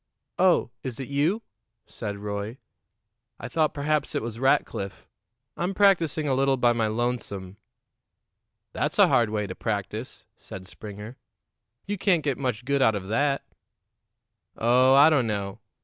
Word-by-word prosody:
"Oh, 180 -9 +3
is 130 -2 -6
it 135 - -6
you?" 155 +11 +1 0.4
said 105 -3 -6
Roy. 105 +3 -5 0.8
"I - - -6
thought 155 -2 +1
perhaps 150 0 -1
it - - -1
was 115 0 -6
Rackliff. 100 -7 0 0.5
I'm 185 +3 -2
practicing 170 -7 +3
a 135 - +2
little 135 0 +2
by 120 -1 +3
my 115 -2 0
lonesome." 110 -4 -3 1.2
"That's - - -2
a - - +6
hard 115 -3 +3
way 105 -1 -1
to 90 - -6
practice," - - -4
said 95 0 -10
Springer. 105 +5 -9 0.7
"You 205 -1 -3
can't 180 -6 +2
get 140 -3 -1
much 125 -4 -2
good 140 0 +1
out 110 -4 +4
of 95 -1 -5
that." 140 +5 +1 1.1
"Oh, 125 +3 +4
I 145 +3 +7
don't 135 -6 +2
know. 100 -2 -3
125 Hz, 150 wpm, -26 LUFS, 105-145 Hz, 1.2 s, I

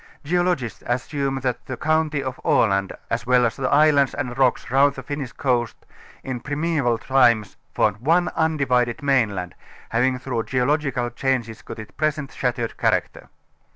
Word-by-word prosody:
Geologists 155 - 0
assume 135 +2 -2
that 125 -2 -2
the 130 - -5
county 155 0 0
of 130 -1 -5
Aland 100 -3 +2 0.2
as 115 - -2
well 125 -1 +4
as 115 - -1
the 130 -2 -1
islands 145 -2 +4
and 125 -4 -3
rocks 130 -3 +1
round 140 +2 +4
the 135 - -7
Finnish 140 -2 -5
coast 125 -4 -1 0.4
in 130 -2 -4
prim┼ōval 145 -4 0
times 120 -6 +3 0.2
formed 105 -1 +2
one 165 +9 +2
undivided 140 -5 0
mainland, 105 -11 +1 0.4
having 125 +3 +1
through 125 -2 -3
geological 130 -2 0
changes 120 -3 -2
got - - -9
its 110 -1 -9
present 150 -2 -2
shattered 120 -2 -2
character. - - 0
130 Hz, 150 wpm, -22 LUFS, 120-145 Hz, 0.4 s, well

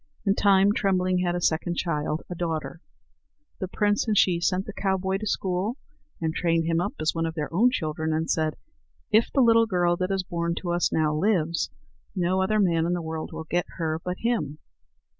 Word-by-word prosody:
In 195 - +4
time 200 0 +4
Trembling 185 -3 +1
had 175 -1 0
a - - -1
second 170 +1 0
child, 155 -2 -1
a - - -5
daughter. 165 -1 -4 0.8
The 190 - -2
prince 205 +3 +1
and 215 -2 +1
she 175 -2 +4
sent 185 +2 +1
the 210 - -7
cowboy 190 -1 0
to 215 - -4
school, 190 +6 -1 0.4
and 160 -1 -1
trained 165 -1 +1
him 165 0 +1
up - - -3
as 155 0 +1
one 165 0 -1
of 160 - -5
their 150 -1 -4
own 225 +8 +5
children, 160 -8 -2
and 160 +1 0
said: 155 -1 0 0.6
"If 220 +2 +4
the 275 - +3
little 230 -1 +5
girl 175 -3 +2
that 185 +1 -1
is 195 -1 0
born 170 -1 -2
to 175 -1 -3
us 175 0 +1
now 155 -1 +1
lives, 170 -2 +1 0.5
no 185 +1 +1
other 215 +3 +1
man 170 -4 +2
in 175 - 0
the 175 - -1
world 160 0 -5
will - - -6
get 175 +2 -1
her 160 -2 -2
but 180 0 -3
him." 210 - -1
175 Hz, 205 wpm, -26 LUFS, 165-195 Hz, 0.8 s, own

